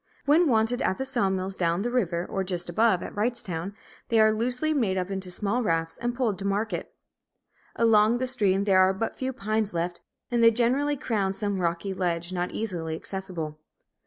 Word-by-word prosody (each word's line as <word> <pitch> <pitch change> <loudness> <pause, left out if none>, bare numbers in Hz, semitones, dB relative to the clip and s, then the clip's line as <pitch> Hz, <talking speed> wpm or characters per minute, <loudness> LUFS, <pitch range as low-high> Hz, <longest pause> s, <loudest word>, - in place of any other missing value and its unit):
When 320 +4 +5
wanted 225 +1 +2
at 185 - +1
the 265 - -3
saw 240 -7 +1
mills 190 0 -2
down 170 +1 0
the 240 - -1
river, 180 -8 0
or 195 - -2
just 180 -2 -3
above, 215 +1 +2
at - - -7
Wrightstown, 205 -5 -2 0.3
they 230 - +3
are 220 0 +6
loosely 250 +8 0
made 215 -10 +1
up 185 +1 -2
into 190 -1 -4
small 205 +6 -1
rafts 165 -6 0
and 240 0 -2
poled 230 -6 0
to 195 - -5
market. 205 +3 -2 0.8
Along 225 0 +4
the 255 - -1
stream 205 -7 +2
there 195 -2 +4
are 185 0 +5
but 225 +4 -3
few 260 0 -2
pines 215 -4 -2
left, 175 +1 -2 0.3
and 240 -1 +2
they 230 - +9
generally 255 +6 +1
crown 205 -7 -1
some 200 -1 -2
rocky 170 +3 -1
ledge, 175 -1 -2
not 180 0 -1
easily 170 -7 -3
accessible. 165 -4 -5
200 Hz, 190 wpm, -26 LUFS, 185-235 Hz, 0.8 s, they